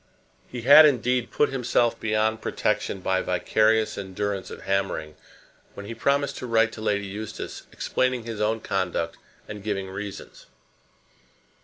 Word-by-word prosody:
He 125 - -7
had, 150 +4 +9
indeed, 125 -3 +1
put 150 - +2
himself 125 -2 +1
beyond 110 0 0
protection 95 - -1
by 95 0 +1
vicarious 110 +4 +1
endurance 100 0 -3
of - - -9
hammering 95 -6 -1 0.6
when 100 - -8
he 115 - -6
promised 140 +3 0
to 125 - -5
write 115 -1 +3
to 110 - -9
Lady 100 -2 0
Eustace, 105 +2 -7
explaining 130 -2 -1
his 115 -2 -5
own 110 +1 0
conduct 90 -5 -2 0.3
and 105 -1 -7
giving 95 -2 -3
reasons. 100 +1 -8
110 Hz, 140 wpm, -25 LUFS, 100-120 Hz, 0.6 s, had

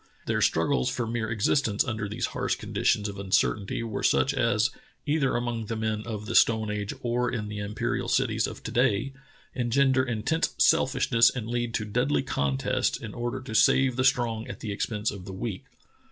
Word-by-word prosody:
Their - - 0
struggles 65 0 +2
for 120 - -2
mere 115 -1 -2
existence 110 0 +1
under 110 -4 -3
these 105 - -2
harsh - - 0
conditions 105 0 0
of 100 -1 -7
uncertainty 100 +2 0
w^ere 110 -3 -4
such 135 - +3
as 115 -1 +2 0.2
— - - -35
either 145 -3 +1
among 120 -2 -2
the 115 - -3
men 110 -1 -1
of 105 -2 -5
the - - -4
stone 110 -2 +4
age 105 -1 -3
or 120 0 0
in 110 -4 -3
the 105 0 -5
imperial 100 +1 -2
cities - - +1
of - - -9
to - - -5
day 125 +1 +1 0.2
— - - -30
engender 130 +2 +2
intense 120 +6 -1
selfishness 130 -6 +4
and 120 -4 -5
lead 120 -1 -2
to 110 - -1
deadly 125 +7 0
contests 70 - 0
in - - -8
order 120 +1 -3
to 120 -4 -8
save 130 +3 +4
the 130 - 0
strong 120 -3 +1
at - - -7
the 105 - -4
expense 105 +1 -2
of 100 -3 -9
the 95 - -7
weak. 95 0 -5
115 Hz, 195 wpm, -27 LUFS, 105-125 Hz, 0.2 s, stone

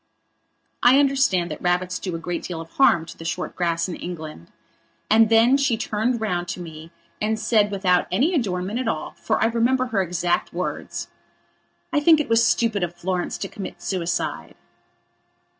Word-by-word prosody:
I 250 +2 +6
understand 270 - +2
that 150 - -6
rabbits 180 +1 0
do 185 -3 -4
a - - -2
great 170 +1 -4
deal 175 -3 -5
of 165 0 -9
harm 170 -12 +4
to - - -10
the - - -10
short 165 +2 -4
grass 170 -1 0
in 180 - -5
England. 155 - -8 0.6
And 220 0 +6
then 230 +4 +5
she 275 -5 +1
turned 225 +2 -1
round 180 -5 -2
to 170 +1 -5
me 160 -1 -9 0.3
and 220 +1 0
said 215 -1 +2
without 185 -3 +1
any 265 - +2
adornment 200 - -1
at 255 - -2
all, 155 -8 -2
for - - -2
I - - +3
remember 235 +3 +2
her 225 -6 0
exact 175 -1 -1
words: - - -4 0.9
"I 295 - +4
think 315 +1 +5
it 300 - -2
was 230 0 +4
stupid 225 -2 +2
of 175 0 -2
Florence 180 0 -2
to 195 - -4
commit 195 0 -8
suicide." 170 - -3
190 Hz, 175 wpm, -23 LUFS, 175-230 Hz, 0.9 s, I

